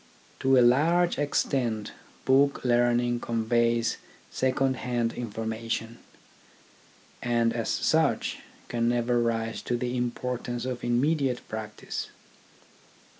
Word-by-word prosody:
To 135 0 +4
a 125 - +6
large 165 +8 +3
extent 120 -6 0 0.3
book 140 +1 +3
learning 120 0 +2
conveys 115 0 +1 0.3
second 130 0 +1
hand 120 -2 -1
information, 115 0 -4 1.2
and 120 -1 +1
as - - -2
such - - +1 0.3
can 115 0 0
never 120 0 +1
rise 115 -1 -1
to 120 - -1
the 125 0 -2
importance 125 0 -3
of 125 -1 -4
immediate 130 +1 +1
practice. 110 -1 -5
120 Hz, 100 wpm, -27 LUFS, 115-130 Hz, 1.2 s, a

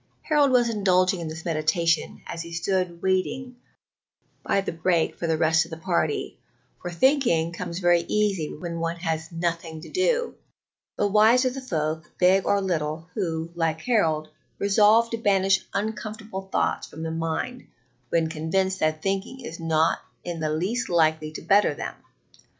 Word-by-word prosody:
Harold 295 -3 +3
was 250 -2 +4
indulging 185 -4 +2
in 165 - -4
this 160 +2 -7
meditation 165 0 0
as 170 - -5
he 170 0 -8
stood 175 0 -1
waiting 240 +7 -1 0.9
by 200 - +1
the 195 - -2
break 165 0 +1
for 170 - -3
the 160 -1 +1
rest 160 0 +3
of - - -12
the 160 - -7
party, 165 -3 -1 0.4
for 175 - -4
thinking 175 - +2
comes 170 0 -5
very 175 -2 +4
easy 200 -7 0
when 170 +1 -5
one 165 0 -1
has 160 -1 -3
nothing 165 -1 -3
to 155 - -11
do; 475 +6 +1 0.6
but 205 - +1
wise 220 +5 +5
are 255 - +2
the 270 +1 -6
folk, 160 -7 -2
big 185 +1 +4
or 200 - +3
little, 160 -3 -2
who, 165 -4 -2
like 165 -2 -1
Harold, 160 -11 +1 0.3
resolve 210 +3 +4
to 230 - -2
banish 195 -3 +3
uncomfortable 210 -1 -4
thoughts - - 0
from 160 - -8
the 160 - -3
mind 165 +10 -3 0.4
when 165 -1 +2
convinced 190 +5 -1
that 155 0 0
thinking 195 +6 -2
is 170 - -7
not 160 -1 +2 0.2
in 175 -2 -5
the 155 -1 -1
least 190 +11 -1
likely 160 -2 +2
to 155 - -8
better 205 +1 +4
them. - - -5
175 Hz, 165 wpm, -25 LUFS, 160-205 Hz, 0.9 s, wise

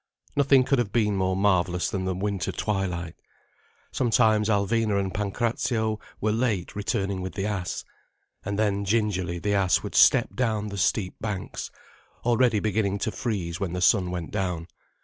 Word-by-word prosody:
Nothing 135 -2 +5
could 135 0 +1
have 110 -4 -1
been 105 -3 +2
more 95 -1 +1
marvellous 95 -2 +1
than 95 -3 -2
the 95 -1 -1
winter 100 -1 -2
twilight. 90 -5 -2 0.8
Sometimes 110 -3 +3
Alvina 105 0 +1
and 95 -1 -2
Pancrazio 110 +1 -1 0.2
were 110 - +1
late 110 -5 -1
returning 100 -2 -1
with 95 - -5
the 100 -1 -2
ass. 95 -6 -3 0.6
And 100 0 -3
then 100 -2 +1
gingerly 95 -5 0
the 100 +4 -1
ass 90 -4 +2
would - - -6
step - - +5
down 110 -4 -1
the 100 - -6
steep 95 0 +1
banks, 105 -4 -4 0.6
already 120 -2 +3
beginning 100 -1 0
to 110 +2 -2
freeze 100 -9 -3
when 95 -4 -2
the 90 - -2
sun 90 0 +4
went 90 -2 -5
down. 90 -5 -2
100 Hz, 160 wpm, -26 LUFS, 95-110 Hz, 0.8 s, Nothing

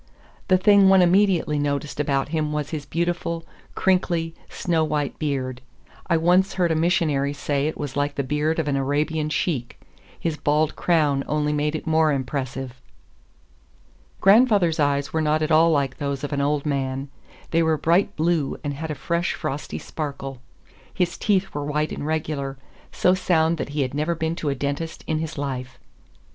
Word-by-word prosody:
The 185 - +5
thing 200 0 +6
one 190 -1 +6
immediately 180 -4 +3
noticed 145 0 -2
about 140 -2 0
him 155 -1 -1
was 150 -1 -3
his 150 -3 -5
beautiful, 170 0 -2 0.3
crinkly, 175 -3 +1 0.2
snow 165 -3 0
white 150 -2 -2
beard. 130 -4 -2 0.5
I 170 - +3
once 180 +4 +3
heard 175 -3 +2
a - - +2
missionary 155 -4 +1
say 145 0 -1
it 155 - -4
was 145 -3 -5
like 145 0 -1
the 140 - -1
beard 150 +4 0
of 160 -3 -1
an 140 - +1
Arabian 150 +3 0
sheik. 150 -5 -2 0.4
His 165 -2 -2
bald 150 +1 +1
crown 150 -5 +2
only 150 0 0
made 150 +1 0
it - - -5
more 160 -1 +3
impressive. 130 -1 -4 1.4
Grandfather's 200 -6 +4
eyes 140 -1 +1
were 160 - +1
not 155 0 +1
at 155 - -1
all 160 +2 +6
like 140 -4 0
those 140 -1 -3
of 145 - -3
an 140 - 0
old 145 +1 0
man; 135 -1 -2 0.4
they 165 - +3
were 160 -1 +2
bright 170 +6 +2
blue, 160 -3 0
and 145 -1 -2
had 160 +3 -5
a 150 - -2
fresh, 170 +5 -1
frosty 140 +2 -4
sparkle. 135 -4 -6 0.5
His 180 -2 -1
teeth 195 -2 0
were 145 - -3
white 150 +1 -1
and 145 - -4
regular—so 145 +2 -2
sound 170 -3 +2
that - - -3
he 145 0 -2
had 130 - -4
never 155 +4 0
been 160 0 -2
to 150 - -2
a 140 - -1
dentist 145 +4 -4
in 155 -1 -1
his 160 -1 -5
life. 130 -2 -4
150 Hz, 175 wpm, -23 LUFS, 140-165 Hz, 1.4 s, thing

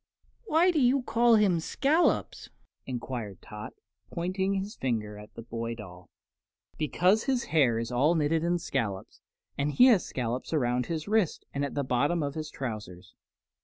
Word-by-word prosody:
"Why 350 -1 +4
do 315 -4 +1
you 255 +1 +3
call 235 0 +4
him 200 -6 +3
Scollops?" 295 - +1 0.4
enquired 120 -6 -5
Tot, 105 0 -8 0.4
pointing 190 +3 -1
his 195 +2 -3
finger 105 -5 -3
at 105 0 -14
the 115 - -8
boy 115 0 -4
doll. 90 -5 -12 0.7
"Because 180 +7 +2
his 260 -3 +1
hair 130 -8 +4
is 115 +1 -3
all 145 +7 +3
knitted 160 +1 +1
in 175 +1 +1
scollops, 110 - -4 0.4
and 145 +1 0
he 250 - +7
has 230 -8 +5
scollops 125 +3 -4
around 125 -4 +1
his 160 0 -4
wrists 215 -5 +1
and 140 - -1
at 140 - -3
the 140 - 0
bottom 145 +6 +1
of 140 -1 -3
his 155 -1 -5
trousers." 110 -10 -7
145 Hz, 165 wpm, -28 LUFS, 120-195 Hz, 0.7 s, he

